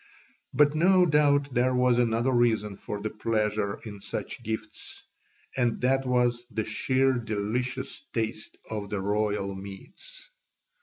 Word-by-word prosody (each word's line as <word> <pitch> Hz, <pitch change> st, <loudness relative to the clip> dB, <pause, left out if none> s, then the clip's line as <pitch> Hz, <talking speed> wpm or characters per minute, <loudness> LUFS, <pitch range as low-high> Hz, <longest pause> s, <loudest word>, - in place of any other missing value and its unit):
But 150 Hz, 0 st, +4 dB
no 180 Hz, +3 st, +5 dB
doubt 145 Hz, -3 st, +3 dB
there 125 Hz, +1 st, +2 dB
was 125 Hz, -1 st, +3 dB
another 120 Hz, +2 st, +2 dB
reason 110 Hz, -4 st, +2 dB
for 105 Hz, +1 st, -6 dB
the 110 Hz, +1 st, -3 dB
pleasure 105 Hz, -2 st, -1 dB
in 105 Hz, -2 st, -8 dB
such 120 Hz, -, -5 dB
gifts, 110 Hz, -1 st, -6 dB, 0.5 s
and 120 Hz, -3 st, +1 dB
that 135 Hz, +1 st, +2 dB
was 120 Hz, -1 st, +2 dB
the 110 Hz, -2 st, -2 dB
sheer 130 Hz, +5 st, +2 dB
delicious 115 Hz, +1 st, -3 dB
taste 110 Hz, -1 st, -3 dB
of 105 Hz, -2 st, -5 dB
the 105 Hz, -1 st, -2 dB
royal 100 Hz, 0 st, 0 dB
meats. 100 Hz, -, -10 dB
115 Hz, 135 wpm, -27 LUFS, 105-130 Hz, 0.5 s, no